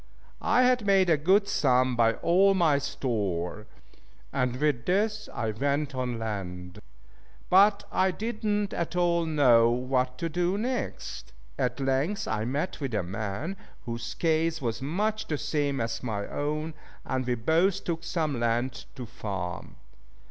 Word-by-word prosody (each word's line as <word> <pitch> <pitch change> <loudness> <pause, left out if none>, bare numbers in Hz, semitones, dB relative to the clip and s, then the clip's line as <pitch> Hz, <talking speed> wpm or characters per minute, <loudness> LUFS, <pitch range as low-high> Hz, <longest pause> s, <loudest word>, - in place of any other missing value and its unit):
I 250 - +3
had 250 -2 +3
made 195 -3 +4
a - - +6
good 190 +7 +3
sum 130 -8 +2
by 115 -1 +4
all 195 +3 +4
my 160 -6 +3
store, 105 -7 -2 0.7
and 125 -1 0
with 140 -3 0
this 210 +3 0
I 110 -1 -2
went 140 +5 -1
on 125 -2 -2
land. 95 -4 -5 0.7
But 200 +2 +6
I 190 - +3
did 220 +4 -4
not 205 -1 0
at 170 +1 -3
all 170 -1 +2
know 125 -7 +5
what 125 +1 0
to 170 - -2
do 175 +3 0
next. 240 - -4 0.3
At 125 +1 0
length 135 +9 0
I 110 0 -1
met 140 +8 -2
with 130 -5 -2
a 95 - 0
man 110 - -4 0.3
whose 115 0 -5
case 160 0 +1
was 120 -4 -3
much 210 +10 -1
the 150 - -1
same 145 -2 -1
as 115 0 -2
my 105 -5 -3
own, 150 +2 -3 0.3
and 130 -1 -1
we 125 -1 0
both 170 - +2
took 165 -1 -3
some 155 -7 -1
land 120 +1 -1
to 125 - -6
farm. 95 -6 -5
140 Hz, 155 wpm, -28 LUFS, 115-175 Hz, 0.7 s, a